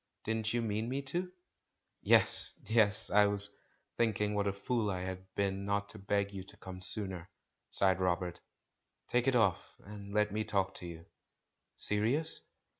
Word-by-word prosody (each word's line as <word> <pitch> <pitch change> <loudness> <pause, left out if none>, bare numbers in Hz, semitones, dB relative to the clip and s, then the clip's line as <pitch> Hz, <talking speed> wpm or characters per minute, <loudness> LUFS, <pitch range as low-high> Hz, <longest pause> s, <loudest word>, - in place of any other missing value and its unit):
Didn't 110 0 -2
you 120 0 -1
mean 110 +1 -2
me 135 +2 -3
to?" 175 +7 -3 0.7
"Yes, - - +5
yes; 105 -2 +5
I 105 0 +5
was 100 0 -3 0.4
thinking 105 -2 0
what 100 -1 0
a - - +1
fool 105 +2 -2
I 90 -2 -3
had 95 0 -7
been 100 -1 -1
not 100 0 -2
to 105 - -8
beg 100 0 -1
you 95 -1 -6
to - - -8
come 95 -1 -9
sooner," 95 -3 0 0.4
sighed 95 -2 +2
Rob 90 -1 +1
ert. 90 -1 -7 0.7
"Take 125 +1 +1
it 135 - +3
off, 105 -8 +2 0.2
and 100 0 -10
let 105 0 +1
me 110 +1 -1
talk 95 -2 -1
to 90 - -8
you." 85 -1 -10 0.7
"Serious?" 120 +10 +1
100 Hz, 170 wpm, -32 LUFS, 95-110 Hz, 0.7 s, Yes